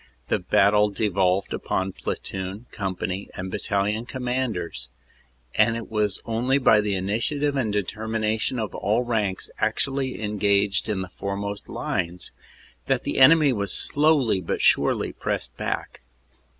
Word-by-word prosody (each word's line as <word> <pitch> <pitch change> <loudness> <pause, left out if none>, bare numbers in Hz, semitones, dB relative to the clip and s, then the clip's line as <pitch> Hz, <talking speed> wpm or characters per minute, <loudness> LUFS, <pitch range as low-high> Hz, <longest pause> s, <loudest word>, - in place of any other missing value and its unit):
The - - +2
battle 105 +1 +4
devolved 95 -2 +1
upon 95 0 -1
platoon, 95 +4 -5
company 95 -1 -3
and 95 0 -5
battalion 105 +3 -1
com 130 0 -6
manders, 110 - -1 0.6
and 115 +2 +3
it 115 - -8
was 105 -3 0
only 120 +4 +1
by 110 -6 +5
the 105 -1 -1
initiative 120 +10 -1
and 120 -6 0
determination 110 +3 -1
of 110 -3 -3
all 110 +5 +1
ranks 105 -6 -1
actually 135 -1 0
engaged 100 -1 +1
in 100 -3 -1
the 95 - -9
foremost 100 +1 -4
lines 85 +1 -3 0.6
that - - +1
the - - -2
enemy 145 0 +7
was 100 -3 -1
slowly 145 -9 +3
but 85 - -2
surely - - +3
pressed - - -3
back. - - -4
105 Hz, 135 wpm, -24 LUFS, 100-120 Hz, 0.6 s, enemy